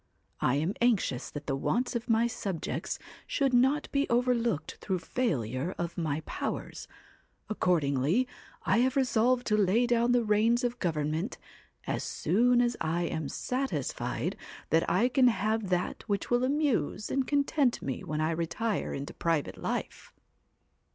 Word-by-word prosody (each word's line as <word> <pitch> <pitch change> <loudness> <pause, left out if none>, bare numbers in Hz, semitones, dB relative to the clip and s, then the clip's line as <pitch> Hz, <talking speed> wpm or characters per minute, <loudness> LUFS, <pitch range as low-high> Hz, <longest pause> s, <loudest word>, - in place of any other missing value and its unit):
I 125 - +2
am 160 +7 0
anxious 220 - +1
that 145 0 -7
the 135 - -1
wants 240 - 0
of 235 +1 -3
my 225 +1 +4
subjects 200 -7 -3 0.3
should 275 -2 +1
not 265 +4 +3
be 280 0 +1
overlooked 235 - +1
through 190 -2 -1
failure 160 - -2
of 170 -1 -3
my 160 -3 -1
powers, - - -5 0.6
accordingly 170 - +2 0.4
I - - +2
have 260 +2 +2
resolved 250 -1 +2
to 215 - +2
lay 210 +4 +3
down 240 0 +2
the 245 -1 +3
reins 225 +3 +3
of 245 0 -1
government 160 - -1 0.5
as - - -2
soon 245 +4 +2
as 240 0 +1
I 165 +2 0
am 160 -3 -2
satisfied 265 - -2 0.4
that - - +3
I 245 - +3
can 255 0 +4
have 220 -2 0
that 180 -1 -1
which 200 +2 -1
will 245 +1 +3
amuse 280 -5 0
and 270 -1 0
content 285 -2 +2
me - - -3
when 155 -4 -2
I 155 +1 +1
retire 170 +7 -2
into 140 +1 -6
private 165 -3 -1
life. - - -4
220 Hz, 150 wpm, -29 LUFS, 165-245 Hz, 0.6 s, my